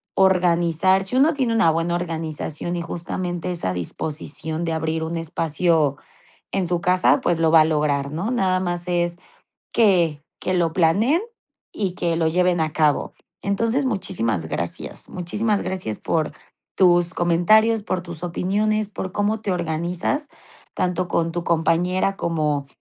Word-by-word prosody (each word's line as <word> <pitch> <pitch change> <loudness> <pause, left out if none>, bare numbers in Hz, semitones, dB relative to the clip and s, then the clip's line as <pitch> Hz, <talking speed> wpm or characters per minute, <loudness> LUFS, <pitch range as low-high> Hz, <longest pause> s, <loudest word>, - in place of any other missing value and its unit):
organizar. 180 0 +3
Si 195 +6 -2
uno 290 +5 +4
tiene 260 -5 0
una 225 -7 +4
buena 165 +2 0
organización, 165 -1 -4
y 170 - -2
justamente, 175 +1 -3
esa 165 - -2
disposición 155 - -4
de 165 - -1
abrir 160 0 -1
un 165 +1 -3
espacio 160 -2 +1 0.5
en 190 -2 0
su 175 0 -1
casa, 180 +9 +3
pues, 175 -8 +1
lo 165 -1 +3
va 160 -1 +8
a - - +4
lograr, 150 -3 0
¿no?, 175 +9 -2
nada 190 -7 +1
más 175 -1 -3
es 175 -1 0 0.6
que 175 -9 +3 0.2
que 185 - -1
lo 170 -2 +1
planeen 200 - +3 0.5
y 190 -4 -2
que 170 -1 0
lo 165 -1 +2
lleven 180 +1 +2
a 155 -1 0
cabo. 150 -3 +1 0.3
Entonces, 230 +7 0
muchísimas 115 - -1
gracias, 85 +1 -4
muchísimas 205 +4 -1
gracias 180 - -4
por 155 -2 -1 0.5
tus 175 -1 +4
comentarios, 215 +7 +3
por 185 -3 -2
tus 170 -2 -8
opiniones, 205 +4 0
por 190 -2 -5
cómo 210 +1 0
te 210 - -3
organizas, 175 - -2 0.5
tanto 180 0 -1
con 165 -1 0
tu 175 +1 -3
compañera 175 +4 +1
como, 150 -5 -1
175 Hz, 150 wpm, -22 LUFS, 160-190 Hz, 0.6 s, va